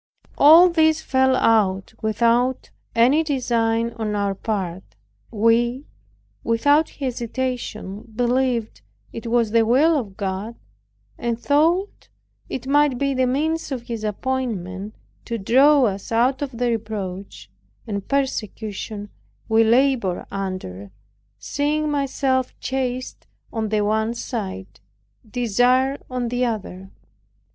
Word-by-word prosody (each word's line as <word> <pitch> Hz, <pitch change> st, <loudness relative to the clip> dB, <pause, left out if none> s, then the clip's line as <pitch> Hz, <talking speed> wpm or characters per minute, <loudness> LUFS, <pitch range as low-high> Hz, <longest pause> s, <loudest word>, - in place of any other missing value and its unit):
As 330 Hz, +5 st, +8 dB
this 315 Hz, -1 st, +3 dB
fell 265 Hz, -4 st, +2 dB
out 205 Hz, -6 st, +2 dB
without 235 Hz, +3 st, +1 dB, 0.2 s
any 255 Hz, +7 st, +4 dB
design 235 Hz, -5 st, 0 dB
on 215 Hz, -2 st, -2 dB
our 200 Hz, -1 st, 0 dB
part, 190 Hz, -3 st, -3 dB, 0.5 s
we, 235 Hz, +4 st, +1 dB, 0.6 s
without 285 Hz, +7 st, +3 dB
hesitation, 240 Hz, -5 st, -4 dB
believed 245 Hz, -, 0 dB, 0.3 s
it 230 Hz, +1 st, -6 dB
was 230 Hz, -2 st, +1 dB
the 230 Hz, 0 st, +4 dB
will 275 Hz, +9 st, +4 dB
of 215 Hz, -9 st, -4 dB
God; 200 Hz, +3 st, -4 dB, 0.6 s
and 235 Hz, -1 st, -2 dB
thought 330 Hz, +9 st, +1 dB, 0.4 s
it 260 Hz, -, -5 dB
might 285 Hz, -1 st, +3 dB
be 275 Hz, +1 st, 0 dB
the 260 Hz, -1 st, +1 dB
means 310 Hz, +5 st, -1 dB
of 255 Hz, -3 st, -3 dB
His 230 Hz, -3 st, -6 dB
appointment 210 Hz, -4 st, -3 dB, 0.3 s
to 230 Hz, -, -3 dB
draw 270 Hz, +7 st, +5 dB
us 200 Hz, -3 st, -2 dB
out 250 Hz, +4 st, +2 dB
of 265 Hz, -5 st, -4 dB
the 245 Hz, 0 st, +1 dB
reproach 195 Hz, -, -5 dB, 0.3 s
and 200 Hz, -3 st, -5 dB
persecution 215 Hz, -6 st, -3 dB, 0.4 s
we 225 Hz, +1 st, +4 dB
labored 235 Hz, -5 st, +2 dB
under, 185 Hz, -, -5 dB, 0.5 s
seeing 295 Hz, -, -1 dB
myself 270 Hz, -2 st, -1 dB
chased 255 Hz, -1 st, -4 dB, 0.3 s
on 220 Hz, -1 st, -2 dB
the 215 Hz, 0 st, +1 dB
one 220 Hz, +2 st, 0 dB
side, 190 Hz, -, -6 dB, 0.5 s
desired 250 Hz, +4 st, +2 dB
on 250 Hz, -2 st, -2 dB
the 245 Hz, +1 st, -1 dB
other. 195 Hz, -5 st, -4 dB
235 Hz, 115 wpm, -22 LUFS, 210-265 Hz, 0.6 s, As